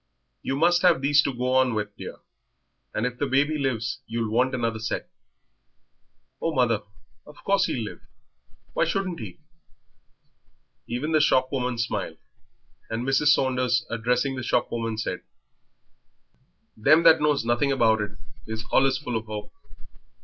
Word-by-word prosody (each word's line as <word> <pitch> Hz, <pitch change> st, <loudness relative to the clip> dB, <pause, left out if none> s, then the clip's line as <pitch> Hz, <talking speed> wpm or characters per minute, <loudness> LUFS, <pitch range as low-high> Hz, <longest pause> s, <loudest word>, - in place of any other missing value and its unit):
"You 135 Hz, -, -2 dB
must 175 Hz, +4 st, +3 dB
have 180 Hz, -5 st, +5 dB
these 145 Hz, +1 st, +4 dB
to 140 Hz, -, -1 dB
go 125 Hz, 0 st, -2 dB
on 130 Hz, -3 st, +3 dB
with, 105 Hz, -1 st, -3 dB
dear, -, -, -8 dB, 0.7 s
and 110 Hz, -, -1 dB
if 125 Hz, 0 st, -4 dB
the 145 Hz, -, 0 dB
baby 145 Hz, +3 st, +1 dB
lives 120 Hz, -4 st, -2 dB
you'll 115 Hz, -1 st, -2 dB
want 130 Hz, +3 st, +2 dB
another 115 Hz, -2 st, -2 dB
set." 110 Hz, -, -4 dB, 1.3 s
"Oh, 165 Hz, -, -1 dB
mother, 120 Hz, -4 st, +2 dB, 0.5 s
of 150 Hz, -, -13 dB
course 195 Hz, -1 st, +2 dB
he'll 120 Hz, -, -2 dB
live; -, -, -9 dB, 0.7 s
why -, -, +2 dB
shouldn't 190 Hz, -3 st, -2 dB
he?" 105 Hz, -6 st, -8 dB, 1.5 s
Even 125 Hz, +7 st, -3 dB
the 155 Hz, -1 st, +4 dB
shopwoman 130 Hz, -3 st, +1 dB
smiled, 115 Hz, 0 st, -3 dB, 0.7 s
and 115 Hz, +3 st, -3 dB
Mrs. 135 Hz, +2 st, +2 dB
Saunders, 125 Hz, -4 st, +2 dB
addressing 125 Hz, +4 st, 0 dB
the 130 Hz, -, -4 dB
shopwoman, 115 Hz, -2 st, -1 dB
said 110 Hz, -, -3 dB, 1.5 s
"Them 150 Hz, +9 st, +4 dB
that 165 Hz, -1 st, +7 dB
knows 150 Hz, -5 st, +2 dB
nothing 120 Hz, +4 st, +1 dB
about 110 Hz, -5 st, +3 dB
it 105 Hz, -1 st, -4 dB, 0.3 s
is 110 Hz, 0 st, -5 dB
allus 135 Hz, -1 st, +4 dB
full 135 Hz, -4 st, -5 dB
of 110 Hz, -1 st, -4 dB
'ope." 105 Hz, -1 st, -6 dB
125 Hz, 145 wpm, -25 LUFS, 115-145 Hz, 1.5 s, that